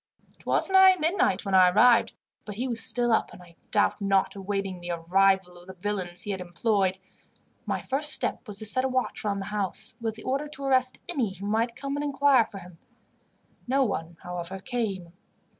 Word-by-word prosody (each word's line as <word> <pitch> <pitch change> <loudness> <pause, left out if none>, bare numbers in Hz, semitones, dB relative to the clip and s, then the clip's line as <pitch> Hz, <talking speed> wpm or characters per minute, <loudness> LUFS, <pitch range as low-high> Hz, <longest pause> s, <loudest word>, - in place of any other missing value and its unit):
"It - - -21
was - - +2
nigh 380 -1 +7
midnight 315 - 0
when 195 - -3
I 185 -1 +7
arrived, 230 +5 +4 0.3
but 210 - -8
he 250 +5 -2
was 235 -2 -2
still 240 -1 0
up, 220 - +1
and 180 - -13
I 170 -1 -18
doubt 205 0 +1
not 195 -1 +2
awaiting 195 -2 -4
the 175 - -7
arrival 180 +1 +1
of 175 - -17
the 190 - -10
villains 185 -2 -3
he 205 - -4
had 190 -2 -4
employed. 190 +1 0 0.7
My - - -2
first 290 +3 0
step - - -2
was 205 -2 -5
to 215 - -3
set 255 +5 +2
a 265 - 0
watch 255 -1 -1
round 200 -2 -1
the 205 +2 -8
house, 200 -3 -2
with 225 -1 -2
the 220 - -11
order 275 +3 -1
to 285 -2 -6
arrest 260 -1 +1
any 250 - -2
who 200 - -8
might 225 +3 0
come 275 +1 -4
and 290 - -2
inquire 280 -4 +3
for 200 - -10
him. 175 -3 -12 0.9
No 270 +2 +2
one, 170 -7 -3
however, 180 +1 -6
came. 195 -7 -4
205 Hz, 205 wpm, -26 LUFS, 190-255 Hz, 0.9 s, nigh